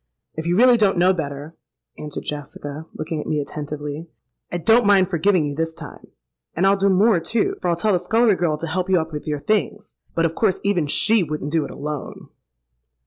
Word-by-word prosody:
—'If 160 +1 -5
you 175 +1 +1
really 245 +1 +6
don't 205 -4 +2
know 180 +2 +4
better,' 145 -1 -6 0.4
answered 150 -1 -6
Jessica, 145 +1 -7
looking 155 0 -4
at - - -8
me 150 - 0
attentively, 150 +2 -6 0.4
'I 175 - -1
don't 225 +7 +4
mind 195 -2 +4
forgiving 175 -1 +2
you 145 - -3
this 160 +2 -3
time. - - -11 0.5
And 175 - +1
I'll 195 +1 +5
do 200 0 +2
more, 195 +1 +4
too, 220 +6 -1
for - - -2
I'll 170 - +2
tell 205 +5 +1
the 180 - +2
scullery 225 +4 +3
girl 170 -4 0
to 165 - -5
help 180 +3 -2
you 185 -2 +4
up 160 0 -5
with 150 - -6
your 150 -1 -2
things; 210 +3 -2 0.2
but 165 - +2
of 165 - 0
course 195 0 +1
even 180 -7 +1
she 215 +8 +3
wouldn't 150 -3 -4
do 160 -2 +1
it - - -8
alone.' 150 -1 -7
170 Hz, 210 wpm, -21 LUFS, 150-195 Hz, 0.5 s, really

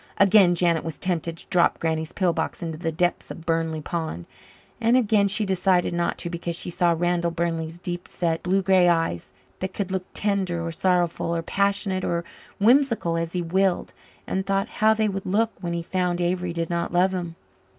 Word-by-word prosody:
Again 195 -3 +6
Janet 170 -2 +2
was 160 -3 -5
tempted 170 -2 -2
to - - -12
drop 175 -2 +3
Granny's 160 -1 -2
pill 180 -3 +1
box 160 +1 -3
into 160 -2 -5
the 165 -2 -1
depths 175 +2 -1
of 165 - -9
Burnley 165 -2 0
Pond 160 - -4 0.5
and 235 +2 +4
again 215 -4 +3
she 205 +2 -1
decided 185 -2 +2
not 170 0 -1
to 170 - -4
because 170 0 -4
she 175 - -4
saw 170 0 +2
Randall 175 0 +1
Burnley's 165 -1 -2
deep 175 0 -5
set, 165 -2 -1
blue 190 +2 +1
grey 185 -2 +5
eyes, 165 - 0 0.3
that 190 0 -4
could 195 -2 -3
look 185 -1 -2
tender 190 -5 -1
or 165 - -3
sorrowful 175 -1 0
or 165 - -2
passionate 200 0 0
or 170 0 -1 0.4
whimsical 230 -6 +3
as 165 0 -2
he 180 -1 -1
willed, 185 +2 0 0.3
and 190 - -1
thought 195 0 0
how 220 0 +5
they 220 0 +1
would 195 -1 -4
look 220 +4 +2
when 170 -2 -3
he 170 0 -2
found 180 0 -1
Avery 180 0 0
did 170 0 -3
not 170 0 -1
love 180 +2 +3
him. 175 -3 -4
175 Hz, 195 wpm, -24 LUFS, 170-190 Hz, 0.5 s, Again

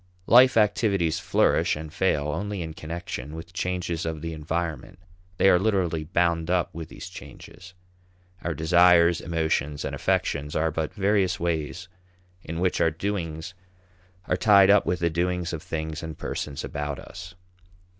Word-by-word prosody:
Life 125 0 +6
activities 100 -6 +2
flourish - - +2
and 75 0 -8
fail 75 -6 +1
only 100 +4 -3
in 80 -1 -6
connection 80 -3 -6
with 85 +2 -9
changes 90 -2 -2
of 80 -1 -4
the 85 0 -4
environment. 80 +1 -4 0.4
They - - +4
are 90 - +6
literally 90 -6 0
bound 85 0 0
up 90 -2 0
with 80 -1 -7
these - - -9
changes; 90 +1 -12 0.7
our 85 -2 -3
desires, 85 +2 +5
emotions, 80 -3 -1
and - - -4
affections 75 +1 -1
are 80 +1 +1
but 80 0 -2
various 100 -1 +1
ways 85 0 -2 0.6
in 80 +1 -5
which 90 0 0
our 80 - +4
doings 80 -1 -4 0.7
are - - 0
tied 100 -1 +6
up 100 -4 +4
with 90 0 -1
the 85 -1 +1
doings 90 +1 -1
of 80 - -4
things 80 -1 -4
and 80 -1 -7
persons 70 -2 -4
about 75 -1 -4
us. 90 -1 -10
85 Hz, 155 wpm, -25 LUFS, 80-90 Hz, 0.7 s, Life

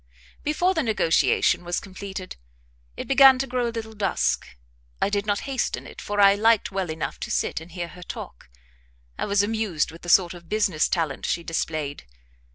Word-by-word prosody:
Before 350 +5 +1
the 320 - +1
negotiation 210 -6 +2
was 175 0 -1
completed, 190 -1 -8 0.6
it - - -5
began 270 -1 +7
to 265 - -1
grow 250 -2 -1
a - - -1
little 225 -1 -6
dusk. 200 -4 0 0.5
I 200 - +1
did 205 0 -1
not 205 -1 0
hasten 270 -2 -2
it, - - -10
for 205 0 -3
I 200 -1 +7
liked 220 +1 +3
well 190 -3 -2
enough 160 0 -4
to - - -5
sit - - -1
and 165 +2 -12
hear 175 0 -5
her 180 +2 -13
talk; - - -9 0.7
I - - 0
was 200 0 +3
amused 210 -8 -1
with 165 - -13
the 175 - -7
sort 175 0 +5
of 175 -1 -13
business 195 -7 +1
talent 160 -6 -1
she 170 - -1
displayed. 155 - -3
200 Hz, 185 wpm, -24 LUFS, 170-220 Hz, 0.7 s, began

